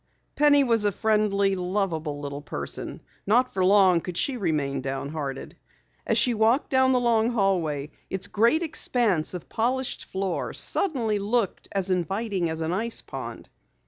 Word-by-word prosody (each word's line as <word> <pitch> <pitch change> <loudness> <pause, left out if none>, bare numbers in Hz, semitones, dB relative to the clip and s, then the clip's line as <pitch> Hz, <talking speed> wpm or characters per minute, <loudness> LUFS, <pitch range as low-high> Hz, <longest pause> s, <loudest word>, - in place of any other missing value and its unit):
Penny 290 -1 +5
was 230 -4 +3
a 205 - +2
friendly, 200 -2 +1
loveable 180 -6 -2
little 140 0 -5
person. 70 - -6 0.3
Not 245 +5 +3
for 190 - 0
long 185 -3 +5
could 175 0 -6
she 275 - 0
remain 150 - -1
downhearted. 135 +1 -5 0.5
As - - +2
she 245 - +3
walked 225 +5 +2
down 260 0 +4
the 255 - +3
long 230 -2 +2
hallway, 165 -9 0 0.2
its 190 0 -1
great 235 +11 +2
expanse 225 - +1
of 180 - -8
polished 255 +3 -2
floor 190 -1 -3
suddenly 235 - 0
looked 210 0 -1
as 195 -1 -1
inviting 190 0 -1
as 160 0 -4
an 160 +2 -1
ice 225 +5 -1
pond. - - -8
195 Hz, 150 wpm, -25 LUFS, 165-235 Hz, 0.5 s, Penny